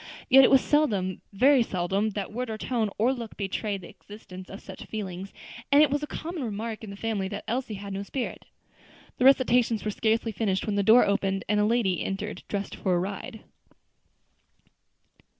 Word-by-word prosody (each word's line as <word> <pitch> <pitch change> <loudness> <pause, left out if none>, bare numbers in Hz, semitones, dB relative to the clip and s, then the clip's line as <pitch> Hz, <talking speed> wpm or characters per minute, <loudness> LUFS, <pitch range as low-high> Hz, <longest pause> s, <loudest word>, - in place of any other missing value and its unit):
Yet 270 +1 +9
it - - +6
was 270 -1 +6
seldom, 205 - +1
very 260 +6 +5
seldom 195 0 0
that 200 +1 -4
word 250 +1 -3
or 220 - -4
tone 225 -1 -1
or 240 +5 +3
look 235 -4 -8
betrayed 200 0 -3
the 175 - -11
existence 185 -3 -12
of 195 - -8
such - - -10
feelings; 195 -3 -6 0.4
and 285 +2 +7
it 295 - +2
was 290 +1 0
a 295 - -4
common 330 -1 -5
remark 220 0 -4
in 215 - -7
the 200 - -7
family 205 -2 -2
that 200 +1 -6
Elsie 240 -2 -2
had 200 0 -7
no 195 - -3
spirit. 245 +5 -5 0.7
The 250 - +1
recitations 245 -4 +4
were 210 - 0
scarcely 225 +2 0
finished 200 -3 -1
when 215 - -1
the 200 - +2
door 220 +5 +6
opened 195 -1 0
and 210 +1 +2
a 210 - +3
lady 215 -5 +1
entered 195 +2 -4
dressed 200 -1 -4
for 185 -2 0
a - - +2
ride. 205 +5 -5
215 Hz, 190 wpm, -27 LUFS, 195-245 Hz, 0.7 s, Yet